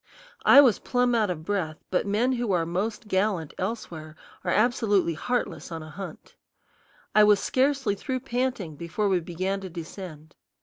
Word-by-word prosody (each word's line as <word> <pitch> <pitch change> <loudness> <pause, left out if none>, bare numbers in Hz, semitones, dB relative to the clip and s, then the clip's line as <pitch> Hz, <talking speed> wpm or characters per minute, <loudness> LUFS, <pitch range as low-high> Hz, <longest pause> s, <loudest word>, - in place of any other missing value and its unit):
I 280 - +10
was 250 -6 +4
plumb 245 -1 +1
out 220 -4 +2
of 160 -3 -4
breath, 170 -6 -2
but 185 - +1
men 220 +6 +2
who 240 -4 -1
are 170 -2 +2
most 205 +6 -3
gallant 190 -5 0
elsewhere 175 -7 -5 0.3
are - - -2
absolutely 210 -6 +2
heartless 245 +3 -3
on 165 -1 -5
a 155 - -10
hunt. 190 +5 -9 0.8
I 215 - +7
was 210 -1 +5
scarcely 265 -3 +1
through 255 +5 -3
panting 245 - -2
before 170 +6 -2
we 190 -2 +2
began 185 +4 -3
to 190 - -6
descend. 165 -2 -9
200 Hz, 165 wpm, -26 LUFS, 170-235 Hz, 0.8 s, I